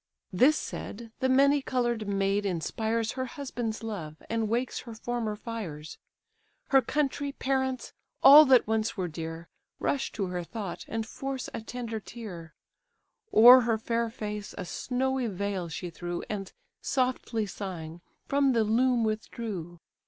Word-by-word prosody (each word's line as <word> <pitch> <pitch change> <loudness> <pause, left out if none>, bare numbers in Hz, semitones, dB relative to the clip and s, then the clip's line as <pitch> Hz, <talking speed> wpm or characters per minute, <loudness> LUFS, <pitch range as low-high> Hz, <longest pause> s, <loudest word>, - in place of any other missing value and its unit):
This 270 +12 +5
said, 230 +1 -6
the 260 0 +1
many 280 +2 +5
coloured 240 -5 -1
maid 195 0 +1
inspires 220 +5 -1
Her 260 0 -3
husband's 240 -5 -4
love, 180 -9 -5 0.2
and 225 -2 0
wakes 240 +3 -1
her 230 -2 -9
former 225 -2 -2
fires; 200 -10 -7 0.7
Her 270 -1 +6
country, 285 +2 -1
parents, 265 -1 -1 0.3
all 290 +3 +11
that 260 -3 +6
once 220 +1 -1
were 185 -2 -1
dear, 165 +1 -6 0.3
Rush 275 - -1
to 200 - -1
her 180 -1 -3
thought, 200 0 -6
and 225 0 -3
force 270 +2 -5
a - - -4
tender 230 -1 -5
tear, 180 -8 -9 0.8
O'er 245 +3 +10
her 230 -2 +1
fair 230 +1 -1
face 210 -2 -6
a 185 - -4
snowy 260 +5 -1
veil 195 -3 -3
she 170 +2 -5
threw, 175 +1 -5
And, 195 -2 -4 0.3
softly 255 -4 0
sighing, 175 -5 -6 0.2
from 275 -1 +2
the 230 -2 +3
loom 240 +2 +2
withdrew. 215 -5 -4
225 Hz, 145 wpm, -28 LUFS, 195-255 Hz, 0.8 s, all